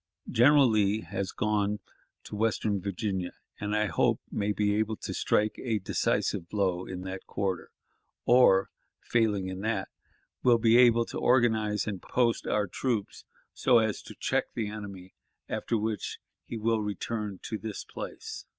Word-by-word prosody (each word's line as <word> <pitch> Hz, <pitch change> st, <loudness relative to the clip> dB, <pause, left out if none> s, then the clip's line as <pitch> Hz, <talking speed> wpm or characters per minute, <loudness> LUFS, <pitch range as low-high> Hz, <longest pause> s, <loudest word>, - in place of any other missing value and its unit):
General 140 Hz, +3 st, +6 dB
Lee 105 Hz, -1 st, +2 dB
has 100 Hz, -2 st, -4 dB
gone 105 Hz, -1 st, 0 dB, 0.4 s
to -, -, -8 dB
western 105 Hz, -2 st, 0 dB
Virginia, 95 Hz, -2 st, -3 dB, 0.3 s
and 105 Hz, 0 st, -2 dB
I 105 Hz, 0 st, +2 dB
hope 95 Hz, -, +2 dB
may 105 Hz, 0 st, 0 dB
be 105 Hz, 0 st, +1 dB
able 110 Hz, 0 st, 0 dB
to -, -, -6 dB
strike 105 Hz, 0 st, +1 dB
a 115 Hz, -4 st, 0 dB
decisive 90 Hz, -3 st, -1 dB
blow 95 Hz, -3 st, 0 dB
in 90 Hz, -1 st, -5 dB
that 95 Hz, 0 st, -7 dB
quarter, 95 Hz, -4 st, -2 dB, 0.6 s
or, 120 Hz, -6 st, +5 dB, 0.3 s
failing 110 Hz, -5 st, +1 dB
in 95 Hz, 0 st, -5 dB
that, 110 Hz, +3 st, -1 dB, 0.5 s
will 120 Hz, -2 st, +5 dB
be 115 Hz, 0 st, +4 dB
able 120 Hz, -1 st, +6 dB
to -, -, -5 dB
organize 110 Hz, -5 st, +2 dB
and 100 Hz, -4 st, -4 dB
post 120 Hz, -2 st, 0 dB
our 105 Hz, -1 st, +1 dB
troops 110 Hz, +2 st, -3 dB, 0.3 s
so 125 Hz, -2 st, +4 dB
as 110 Hz, -2 st, +1 dB
to -, -, -11 dB
check -, -, +1 dB
the 110 Hz, -2 st, -2 dB
enemy, 100 Hz, -3 st, -8 dB, 0.3 s
after 115 Hz, -, -1 dB
which 110 Hz, 0 st, -3 dB, 0.3 s
he 115 Hz, -, -5 dB
will 110 Hz, 0 st, +1 dB
return 105 Hz, -1 st, -3 dB
to 110 Hz, -, -4 dB
this 110 Hz, -2 st, -5 dB
place. -, -, -7 dB
105 Hz, 155 wpm, -29 LUFS, 100-115 Hz, 0.6 s, General